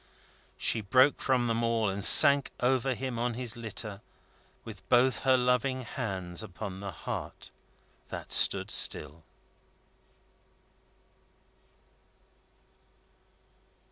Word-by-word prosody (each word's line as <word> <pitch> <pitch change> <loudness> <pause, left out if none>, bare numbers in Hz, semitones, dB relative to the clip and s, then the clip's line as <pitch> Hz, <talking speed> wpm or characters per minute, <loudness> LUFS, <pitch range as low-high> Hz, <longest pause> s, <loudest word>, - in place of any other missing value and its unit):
She 115 - 0
broke 130 +7 +2
from 130 -2 0
them 115 0 -2
all, 115 -2 -1
and 100 +1 -4
sank 140 +5 +7
over 130 +1 -1
him 125 -1 -6
on 120 0 -3
his 120 -2 -2
litter, 105 -3 -7 0.6
with - - -13
both 125 0 +2
her 130 -1 +2
loving 125 +1 -1
hands 95 -7 -6
upon 95 -1 -9
the 100 0 -7
heart 85 - -8 0.6
that - - -9
stood - - +2
still. 75 +2 +2
115 Hz, 100 wpm, -28 LUFS, 100-130 Hz, 0.6 s, sank